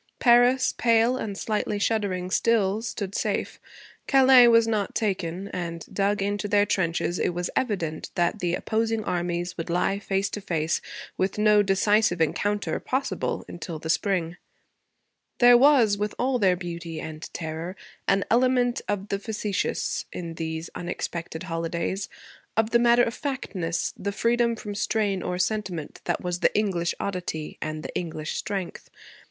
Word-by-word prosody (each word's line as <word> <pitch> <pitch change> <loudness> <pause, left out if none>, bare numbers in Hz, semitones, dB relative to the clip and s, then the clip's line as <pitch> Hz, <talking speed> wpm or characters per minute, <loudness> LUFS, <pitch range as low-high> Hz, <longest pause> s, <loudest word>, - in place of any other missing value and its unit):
Paris, 245 +1 +4
pale, 230 +1 +3
and 205 -5 -4
slightly 210 -1 -1
shuddering 200 -4 -1
still, 215 -2 +2
stood 205 -4 -4
safe. - - -2 0.5
Calais 265 -2 +7
was 230 -1 +5
not 210 -3 -1
taken, 190 -3 -2
and, 170 -3 -5
dug 200 0 +1
into 205 +1 -1
their 205 0 +3
trenches, 175 -2 0
it 175 - 0
was 175 0 -2
evident 175 -11 -2
that 175 +4 +1
the 175 -2 0
opposing 225 +1 -1
armies 175 -1 -2
would 165 - -4
lie 180 +3 +1
face 195 -1 -1
to 210 - -6
face, 160 -4 -1 0.4
with 190 +2 -1
no 210 0 +5
decisive 205 -1 +2
encounter 205 +6 0
possible 270 +2 -2
until 170 -1 -6
the 160 +1 -2
spring. 175 -3 0 1.0
There 245 0 +7
was, 240 -6 +5
with 210 0 -2
all 255 0 +1
their 190 -4 +4
beauty 170 -2 -6
and 155 0 -7
terror, 160 +3 -5 0.3
an 195 0 +2
element 245 0 +3
of 205 0 -2
the 200 - -1
facetious 210 -2 -2
in 170 -2 -6
these 160 0 -5
unexpected 170 -1 -5
holidays, 170 +2 -3 0.5
of 225 0 +2
the 235 - +5
matter 240 0 +5
of 230 - -1
factness, 185 - -3
the 200 - -3
freedom 235 +2 +1
from 210 -2 -6
strain 205 -2 0
or 180 0 -2
sentiment 185 -5 -2
that - - -1
was 180 -1 -2
the - - +3
English 185 -5 0
oddity 180 -5 -4
and 155 0 -4
the - - -7
English 155 -3 -3
strength. 195 -4 -4
195 Hz, 150 wpm, -26 LUFS, 175-220 Hz, 1.0 s, Calais